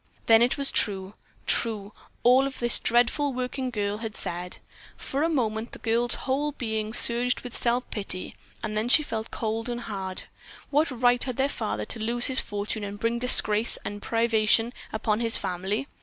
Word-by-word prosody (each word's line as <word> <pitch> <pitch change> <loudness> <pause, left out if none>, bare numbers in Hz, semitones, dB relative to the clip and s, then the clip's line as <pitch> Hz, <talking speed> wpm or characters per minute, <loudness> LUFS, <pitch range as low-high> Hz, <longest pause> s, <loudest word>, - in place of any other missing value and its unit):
Then 225 0 +6
it 245 +2 +2
was 280 -1 0
true, 195 -1 +1 0.3
true, 210 -3 +1 0.3
all 255 +3 +5
that 275 -1 -5
this 240 -1 +2
dreadful 245 +5 +2
working 255 +1 -3
girl 205 -3 -2
had 220 -2 -6
said. 175 +1 -4 0.4
For 275 - -4
a 325 - +2
moment 230 -6 -2
the - - -7
girl's 235 +1 0
whole 285 +3 -1
being 220 -4 -3
surged 240 +2 +5
with 250 -1 -8
self 245 +1 0
pity, 195 -3 -4 0.3
then 215 +2 -2
she 305 - +6
felt 225 -5 -5
cold 225 +1 -3
and 240 0 -4
hard. 190 -4 -4 0.5
What 300 +2 +2
right 245 -1 +2
had 255 -3 -5
their 270 +1 +2
father 105 - -4
to - - -6
lose 235 +2 +1
his 265 -2 +4
fortune 205 +1 -4
and 205 0 -6
bring 230 +2 -1
disgrace 225 -3 +4
and 205 0 -5
privation 225 0 +2 0.3
upon 215 0 +1
his 230 -1 +2
family? 190 +8 -3
230 Hz, 175 wpm, -26 LUFS, 215-250 Hz, 0.5 s, Then